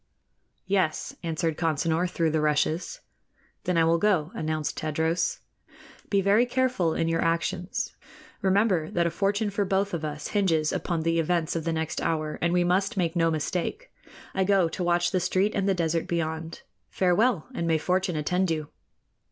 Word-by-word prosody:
"Yes," 190 Hz, -5 st, 0 dB
answered 165 Hz, -1 st, -2 dB
Consinor, 165 Hz, +2 st, +1 dB
through 165 Hz, -2 st, 0 dB
the 155 Hz, 0 st, +1 dB
rushes. 155 Hz, -, 0 dB, 0.6 s
"Then 180 Hz, -2 st, +1 dB
I 165 Hz, -, +5 dB
will 165 Hz, +1 st, +3 dB
go," 180 Hz, -6 st, +2 dB
announced 155 Hz, -1 st, -2 dB
Tadros. 160 Hz, +2 st, -1 dB, 0.7 s
"Be 200 Hz, -1 st, +3 dB
very 205 Hz, +5 st, +4 dB
careful 245 Hz, -10 st, +1 dB
in 165 Hz, -, 0 dB
your 165 Hz, 0 st, +1 dB
actions. 175 Hz, +2 st, -1 dB, 0.5 s
Remember 190 Hz, -4 st, +2 dB
that 170 Hz, -1 st, +1 dB
a 170 Hz, -, +1 dB
fortune 205 Hz, +2 st, 0 dB
for 200 Hz, +1 st, 0 dB
both 195 Hz, 0 st, 0 dB
of 165 Hz, -2 st, -3 dB
us 150 Hz, -1 st, -4 dB
hinges 165 Hz, -7 st, +1 dB
upon 170 Hz, -3 st, -1 dB
the 165 Hz, 0 st, +1 dB
events 165 Hz, 0 st, 0 dB
of 165 Hz, -1 st, -2 dB
the 165 Hz, -, 0 dB
next 160 Hz, -1 st, -2 dB
hour, 155 Hz, -2 st, -1 dB
and 170 Hz, -, +2 dB
we 175 Hz, 0 st, +3 dB
must 195 Hz, +5 st, +1 dB
make 170 Hz, -2 st, 0 dB
no 165 Hz, -1 st, +3 dB
mistake. 170 Hz, -, -3 dB, 0.4 s
I 190 Hz, -, +1 dB
go 190 Hz, -2 st, +3 dB
to 180 Hz, -, -4 dB
watch 175 Hz, 0 st, +2 dB
the 185 Hz, -, +1 dB
street 185 Hz, +4 st, +1 dB
and 200 Hz, 0 st, 0 dB
the 195 Hz, -, +2 dB
desert 165 Hz, -1 st, 0 dB
beyond. 160 Hz, -1 st, -3 dB, 0.3 s
Farewell, 190 Hz, 0 st, +2 dB
and 170 Hz, -8 st, -2 dB
may 165 Hz, -1 st, +3 dB
fortune 180 Hz, +2 st, 0 dB
attend 180 Hz, +5 st, 0 dB
you!" 155 Hz, -2 st, -2 dB
170 Hz, 175 wpm, -26 LUFS, 160-190 Hz, 0.7 s, I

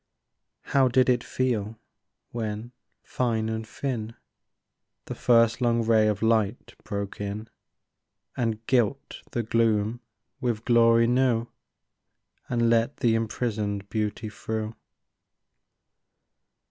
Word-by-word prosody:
How 135 Hz, -2 st, +3 dB
did 130 Hz, +1 st, +3 dB
it 125 Hz, -1 st, +2 dB
feel 120 Hz, -3 st, -1 dB, 0.5 s
when, 110 Hz, 0 st, -4 dB, 0.3 s
fine 115 Hz, -3 st, -1 dB
and 110 Hz, 0 st, -4 dB
thin, 115 Hz, -5 st, -4 dB, 0.9 s
The -, -, -5 dB
first 115 Hz, 0 st, +3 dB
long 120 Hz, -1 st, +2 dB
ray 110 Hz, -1 st, +4 dB
of 105 Hz, 0 st, -1 dB
light 110 Hz, 0 st, +1 dB
broke 100 Hz, -1 st, -5 dB
in, 105 Hz, +2 st, -4 dB, 0.9 s
And 115 Hz, -2 st, -2 dB
gilt 130 Hz, +2 st, 0 dB
the 120 Hz, -, -2 dB
gloom 115 Hz, 0 st, +1 dB, 0.4 s
with 120 Hz, -4 st, -2 dB
glory 115 Hz, -1 st, +5 dB
new, 120 Hz, -1 st, +2 dB, 1.0 s
And 120 Hz, -1 st, +2 dB
let 115 Hz, +3 st, +2 dB
the 120 Hz, -3 st, +2 dB
imprisoned 105 Hz, -3 st, -2 dB
beauty 110 Hz, 0 st, -2 dB
through 110 Hz, 0 st, -4 dB
115 Hz, 105 wpm, -26 LUFS, 110-120 Hz, 1.0 s, glory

